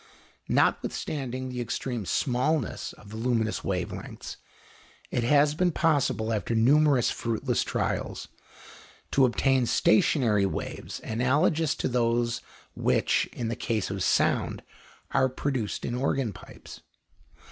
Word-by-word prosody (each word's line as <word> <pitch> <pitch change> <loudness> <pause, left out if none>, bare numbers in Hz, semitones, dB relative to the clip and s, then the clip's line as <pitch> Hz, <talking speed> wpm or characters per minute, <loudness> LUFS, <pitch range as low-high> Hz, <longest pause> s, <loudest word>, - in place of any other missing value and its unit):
Notwithstanding 130 -3 0
the 125 -1 -4
extreme 120 -2 -3
smallness 130 0 0
of 105 - -15
the 110 - -6
luminous 115 -2 0
wave 90 -2 -2
lengths, - - -8 0.7
it 120 - 0
has 145 +4 +4
been 180 +3 +1
possible, 140 -9 +1
after 110 +2 -1
numerous 135 +2 +4
fruitless 115 -2 -1
trials, - - -2 0.8
to 135 - +5
obtain 130 0 +2
stationary 110 -3 +3
waves 80 - -5
analogous 145 +7 +1
to - - -2
those 120 -1 0 0.3
which, - - +1
in 115 -2 -4
the 115 - -2
case 110 -6 -2
of 100 -1 -4
sound, - - +1 0.5
are 130 -1 +3
produced 130 -4 -3
in 120 - -3
organ 130 -3 0
pipes. - - -12
125 Hz, 120 wpm, -27 LUFS, 115-140 Hz, 0.8 s, to